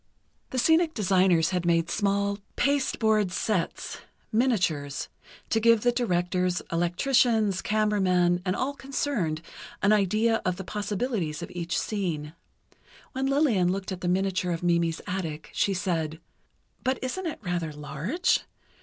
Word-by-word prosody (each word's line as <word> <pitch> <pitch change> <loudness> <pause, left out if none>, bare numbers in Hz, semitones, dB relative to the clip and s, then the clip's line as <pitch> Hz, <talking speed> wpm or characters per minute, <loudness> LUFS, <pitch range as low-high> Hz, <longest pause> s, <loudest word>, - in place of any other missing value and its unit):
The 260 - -4
scenic 320 +5 +3
designers 185 -5 +3
had 180 -2 0
made 170 -1 +2
small 200 0 0 0.2
pasteboard 220 -8 +2
sets, 185 0 -2 0.3
miniatures, 180 - 0 0.4
to 225 - +3
give 230 -1 +5
the 245 - +3
directors, 180 -6 0
electricians, 205 +4 +2
camera 210 -1 +1
men, 180 -1 +3
and 185 0 0
all 275 +2 -1
concerned, 265 - -2 0.4
an 200 +1 +5
idea 215 +3 +2
of 185 - 0
the 190 - -6
possibilities 205 - -2
of - - -8
each 175 -1 -3
scene. 165 -8 -3 0.8
When 265 +1 -1
Lillian 260 - +3
looked 195 0 -3
at 185 -1 -5
the 180 - -2
miniature 185 0 +1
of 170 0 -3
Mimi's 170 -1 +1
attic, 165 -4 -4
she 195 - +1
said: 165 -4 -2 0.6
"But 260 0 +1
isn't 345 +8 -3
it 320 - -4
rather 175 -4 -2
large? 150 - 0
190 Hz, 135 wpm, -27 LUFS, 175-225 Hz, 0.8 s, give